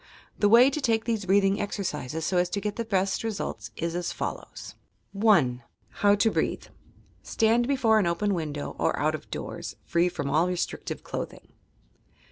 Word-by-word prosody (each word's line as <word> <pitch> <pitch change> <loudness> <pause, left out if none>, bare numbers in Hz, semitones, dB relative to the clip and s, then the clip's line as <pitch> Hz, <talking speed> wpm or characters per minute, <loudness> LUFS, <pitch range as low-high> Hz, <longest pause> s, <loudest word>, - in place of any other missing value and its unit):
The 205 - +4
way 245 +5 +7
to 300 - -3
take 225 -3 +1
these 225 -4 -1
breathing 195 +1 +3
exercises 160 - -3
so 185 - 0
as 180 0 +2
to 200 - -2
get 205 0 -3
the 230 - -2
best 195 -3 0
results 200 - -4
is 170 0 -3
as 175 0 -2
follows: - - -6 0.4
HOW 195 - +2
TO 220 +2 +2
BREATHE - - -2
1. - - -26 0.5
Stand 230 +2 +2
before 245 -6 +3
an 195 - +1
open 200 +4 0
window 150 -4 -4
or - - +1
out - - +1
of - - -7
doors, - - -6
— - - -37
free 170 +1 +2
from 155 -5 -4
all 155 +5 +2
restrictive 180 -1 -3
clothing. - - -7
195 Hz, 175 wpm, -27 LUFS, 170-220 Hz, 0.5 s, way